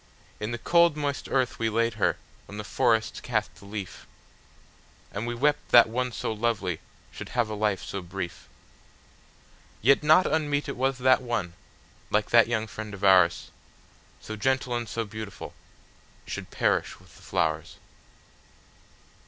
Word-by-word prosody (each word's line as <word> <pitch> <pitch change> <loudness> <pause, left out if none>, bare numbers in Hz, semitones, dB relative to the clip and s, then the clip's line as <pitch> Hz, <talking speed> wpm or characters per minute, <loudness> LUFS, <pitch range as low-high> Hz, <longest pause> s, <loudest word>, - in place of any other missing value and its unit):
In 105 - -3
the 120 - -3
cold 170 +4 +3
moist 145 -2 -2
earth 130 -2 0
we 115 -1 +1
laid 115 +1 +1
her, 110 -3 +1 0.3
when 105 - -9
the 105 - -4
forests 115 +1 +1
cast 110 -7 -1
the 85 +4 -16
leaf, 100 -2 -7 1.0
And 105 +4 -4
we 120 - -2
wept 145 +4 +1
that 120 -1 +8
one 125 +2 -2
so 115 - -3
lovely 105 -6 -1 0.3
should - - -8
have 120 -3 +2
a - - -4
life 105 -4 0
so 100 - -5
brief:Yet 90 - -5
not 155 +4 +5
unmeet 145 -2 0
it 140 - -4
was 130 +1 0
that 130 0 +4
one, 115 -9 -2 0.6
like 105 0 0
that 115 -1 +6
young 110 -2 -1
friend 110 -1 -7
of 100 - -12
ours, 95 -3 +4 0.7
So 110 - -7
gentle 130 +2 0
and 120 -1 -3
so 115 -1 -2
beautiful, 105 -1 -8 0.7
should - - -6
perish - - 0
with - - -20
the - - -17
flowers. - - -1
115 Hz, 155 wpm, -27 LUFS, 105-130 Hz, 1.0 s, that